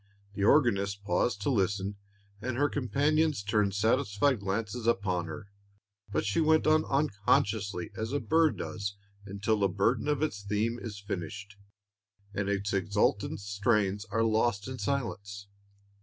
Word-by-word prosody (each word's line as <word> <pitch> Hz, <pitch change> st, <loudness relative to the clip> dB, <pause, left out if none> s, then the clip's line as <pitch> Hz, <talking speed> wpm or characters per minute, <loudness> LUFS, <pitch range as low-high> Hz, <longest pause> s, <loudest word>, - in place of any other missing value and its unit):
The 100 Hz, -, -2 dB
organist 100 Hz, -6 st, +3 dB
paused 100 Hz, +3 st, 0 dB
to 140 Hz, -, +1 dB
listen, 100 Hz, -2 st, 0 dB, 0.5 s
and 125 Hz, +1 st, -3 dB
her 145 Hz, +2 st, +2 dB
companions 145 Hz, 0 st, +1 dB
turned 105 Hz, -1 st, +1 dB
satisfied 115 Hz, +3 st, +2 dB
glances 105 Hz, +4 st, -3 dB
upon 95 Hz, -7 st, +1 dB
her; 80 Hz, +6 st, -8 dB, 0.6 s
but 100 Hz, -, 0 dB
she 105 Hz, +9 st, +1 dB
went 155 Hz, 0 st, +4 dB
on 155 Hz, 0 st, +4 dB
unconsciously, 105 Hz, -, 0 dB
as 110 Hz, +2 st, -3 dB
a 145 Hz, -, 0 dB
bird 160 Hz, 0 st, +2 dB
does 100 Hz, -2 st, -4 dB, 0.3 s
until 100 Hz, +2 st, 0 dB
the 100 Hz, -, +3 dB
burden 110 Hz, +6 st, +1 dB
of 150 Hz, 0 st, +1 dB
its 125 Hz, -10 st, -2 dB
theme 105 Hz, +4 st, -1 dB
is 105 Hz, -4 st, -6 dB
finished, 100 Hz, +1 st, -6 dB, 0.8 s
and 100 Hz, 0 st, -1 dB
its 100 Hz, 0 st, -1 dB
exultant 100 Hz, +1 st, 0 dB
strains 100 Hz, 0 st, 0 dB
are 115 Hz, +1 st, 0 dB
lost 110 Hz, -1 st, +1 dB
in 130 Hz, -1 st, -6 dB
silence. 100 Hz, -7 st, -3 dB
105 Hz, 140 wpm, -30 LUFS, 100-125 Hz, 0.8 s, went